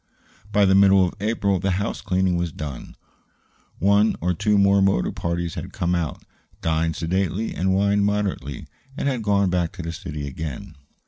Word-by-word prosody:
By 105 -1 +4
the 95 - +4
middle 95 -1 +6
of 90 - -4
April 100 -2 0
the 95 +2 -1
house 100 +3 -3
cleaning 95 -2 +1
was 85 -1 -1
done. 75 -4 -7 0.8
One 100 +4 +3
or 90 +2 0
two 105 +5 +1
motor 100 -6 +3
parties 85 0 -3
had - - -7
come 85 +1 -1
out, 85 -4 -2 0.4
dined 80 0 0
sedately 95 +5 -1
and 95 +1 0
wined 100 +1 +2
moderately, 100 -9 -2 0.3
and - - -1
had 130 -4 -1
gone 100 -3 +2
back 90 -2 0
to 90 - -7
the 85 - -4
city 75 -2 -6
again. 80 +6 -6
95 Hz, 170 wpm, -23 LUFS, 85-100 Hz, 0.8 s, middle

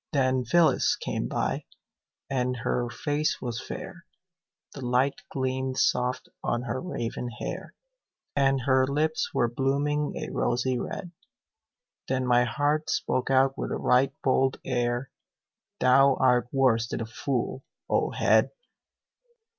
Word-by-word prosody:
Then 130 -2 +2
Phyllis 170 +6 +3
came - - -3
by, - - -2 0.6
and 125 -1 -1
her 120 +1 -1
face 145 +5 -1
was 120 -1 -4
fair, 175 0 -8 0.7
The 140 - -8
light 125 +3 +1
gleamed 130 0 -2
soft 125 0 +1 0.2
on 120 +1 -1
her 130 +1 -3
raven 120 -8 -4
hair; 120 - -6 0.6
And 135 -1 +3
her 130 0 +3
lips 155 +3 0
were 120 - +2
blooming 140 +4 0
a - - -5
rosy 125 +1 0
red. 180 +6 -5 1.0
Then 130 -1 0
my 125 0 +4
heart 145 +5 0
spoke 135 -4 0
out 135 0 +4
with - - -2
a - - -2
right 130 +2 +3
bold 130 0 +2
air: 120 +1 -1 0.7
"Thou 135 +1 +5
art 125 -2 +3
worse 120 -4 +3
than - - -4
a - - -2
fool, 130 +2 -3 0.2
O - - +1
head!" - - +3
130 Hz, 130 wpm, -27 LUFS, 125-140 Hz, 1.0 s, Thou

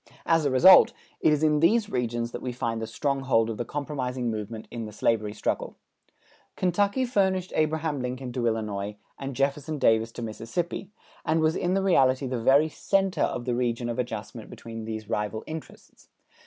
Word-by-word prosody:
As 165 -2 +3
a - - +3
result, 155 +9 +7 0.3
it 155 - +4
is 150 0 +1
in 150 -1 +3
these 210 +7 +3
regions 120 - -2
that - - -6
we 125 - -3
find 115 -2 -3
the 110 - -3
stronghold 125 -1 +1
of 110 - -6
the 120 - -2
compromising 130 -4 -3
movement 110 +1 -6
in 115 -2 -5
the 105 - -8
slavery 110 0 0
struggle. - - -3 0.8
Kentucky 200 +7 +1
furnished 190 -6 0
Abraham 155 -2 0
Lincoln 125 0 -4
to 120 -2 0
Illinois, 105 -2 -2 0.2
and 135 -1 -5
Jefferson 140 +3 -1
Davis 115 -3 +3
to 120 - -6
Mississippi, 115 - -4 0.3
and 160 +1 +1
was 160 0 +2
in 180 +1 0
reality 135 -9 +3
the 125 -2 -2
very 140 +6 +5
center 195 +4 0
of 120 - 0
the 125 - 0
region 120 -1 -1
of 120 +1 -3
adjustment 115 -2 -5
between 115 -1 -8
these 110 -1 -5
rival 105 +2 -2
interests. 160 0 -10
130 Hz, 175 wpm, -26 LUFS, 115-155 Hz, 0.8 s, result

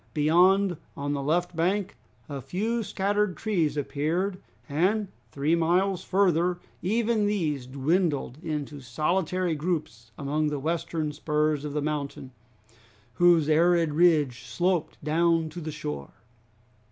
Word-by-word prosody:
Beyond, 175 +4 +4 0.2
on 145 +1 -2
the 140 - -2
left 170 +5 0
bank, 185 +4 0 0.3
a 140 -2 -5
few 210 - -1
scattered 205 -1 0
trees 175 -9 0
appeared, 165 +7 -1 0.3
and 190 +8 +1 0.2
three 140 +6 0
miles 180 +3 +2
further 180 -2 +2 0.2
even 220 +2 +1
these 155 -11 -1
dwindled 145 0 0
into 150 -3 -4
solitary 170 +6 0
groups 150 -8 -3
among 150 +2 0
the 150 -1 -1
western 160 +1 -2
spurs 150 0 0
of 150 -1 -4
the 150 -1 -1
mountain, 145 -3 -4 0.8
whose 170 0 +4
arid 165 0 +3
ridge 150 -7 +3
sloped 165 +7 -1
down 165 +1 +2
to 170 +3 -8
the 155 - -5
shore. 75 - -5
160 Hz, 125 wpm, -27 LUFS, 150-180 Hz, 0.8 s, Beyond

